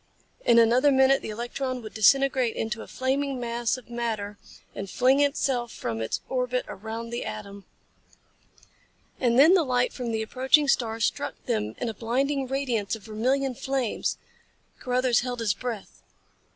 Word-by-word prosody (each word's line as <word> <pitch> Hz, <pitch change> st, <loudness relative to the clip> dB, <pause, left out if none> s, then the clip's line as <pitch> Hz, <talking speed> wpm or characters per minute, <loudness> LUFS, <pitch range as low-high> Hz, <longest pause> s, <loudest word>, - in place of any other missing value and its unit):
In 235 Hz, -, +5 dB
another 240 Hz, +5 st, +5 dB
minute 265 Hz, 0 st, +4 dB
the -, -, -6 dB
electron 245 Hz, +3 st, -4 dB
would 215 Hz, -, -9 dB
disintegrate 260 Hz, +2 st, +3 dB
into 225 Hz, +1 st, -3 dB
a -, -, -9 dB
flaming 270 Hz, +1 st, -1 dB
mass 235 Hz, 0 st, -1 dB
of 255 Hz, -, -13 dB
matter 220 Hz, -4 st, -3 dB, 0.3 s
and 195 Hz, 0 st, -6 dB
fling 260 Hz, +5 st, +3 dB
itself 270 Hz, -4 st, +1 dB
from 115 Hz, -1 st, -4 dB
its 110 Hz, -, -2 dB
orbit 250 Hz, -1 st, -1 dB
around 220 Hz, +3 st, -6 dB
the 240 Hz, -, -3 dB
atom. 200 Hz, -2 st, -7 dB, 1.5 s
And 240 Hz, -2 st, +2 dB
then 310 Hz, +7 st, +8 dB
the 380 Hz, -, +5 dB
light 250 Hz, -4 st, +1 dB
from 245 Hz, -3 st, -4 dB
the 220 Hz, 0 st, -1 dB
approaching 265 Hz, +6 st, +3 dB
star 225 Hz, -4 st, +1 dB
struck 225 Hz, -, -1 dB
them 105 Hz, 0 st, -1 dB
in -, -, -3 dB
a 225 Hz, -, -2 dB
blinding 265 Hz, +5 st, -1 dB
radiance 245 Hz, -6 st, -1 dB
of 220 Hz, -, -12 dB
vermilion 255 Hz, +6 st, 0 dB
flames. 260 Hz, -2 st, -2 dB, 0.6 s
Carruthers 250 Hz, -1 st, +2 dB
held 245 Hz, -1 st, -3 dB
his 220 Hz, -3 st, +1 dB
breath. 230 Hz, -2 st, -6 dB
245 Hz, 155 wpm, -26 LUFS, 225-265 Hz, 1.5 s, then